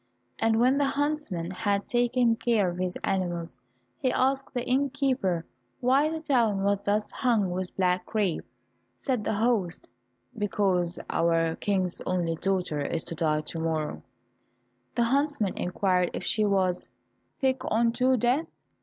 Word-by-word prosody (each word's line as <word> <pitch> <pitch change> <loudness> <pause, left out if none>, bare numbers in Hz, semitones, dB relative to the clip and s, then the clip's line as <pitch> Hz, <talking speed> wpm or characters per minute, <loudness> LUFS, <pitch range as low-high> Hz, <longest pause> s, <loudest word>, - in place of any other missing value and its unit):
And 225 0 +2
when 255 +4 +4
the 285 - +3
huntsman 280 - -1
had 200 0 -1
taken 240 -1 +2
care 220 -6 +1
of 175 - -7
his 185 0 -2
animals, 175 -5 -2 0.4
he 255 - +1
asked 270 +2 +1
the 245 -2 -3
innkeeper 260 - 0 0.3
why 270 +5 +3
the 320 0 -3
town 235 -10 +1
was 200 0 +2
thus 210 +1 0
hung 225 -8 +1
with 185 0 -4
black 180 -1 +1
crape? 205 -7 0 0.6
Said 255 -6 0
the - - -1
host, 215 -5 0 0.5
"Because 195 -4 0
our 165 -1 +1
King's 185 -3 -1
only 175 -2 0
daughter 180 -3 -1
is 160 +3 -2
to - - -6
die 155 -2 +1
to 160 +2 -5
morrow." 160 -2 -2 0.9
The 235 - +3
huntsman 275 -4 +1
inquired 180 0 +1
if - - -4
she 215 -1 +2
was 190 -3 +1 0.5
"sick 265 -1 +1
unto 235 +3 +2
death?" 245 +7 +1
205 Hz, 145 wpm, -27 LUFS, 180-250 Hz, 0.9 s, when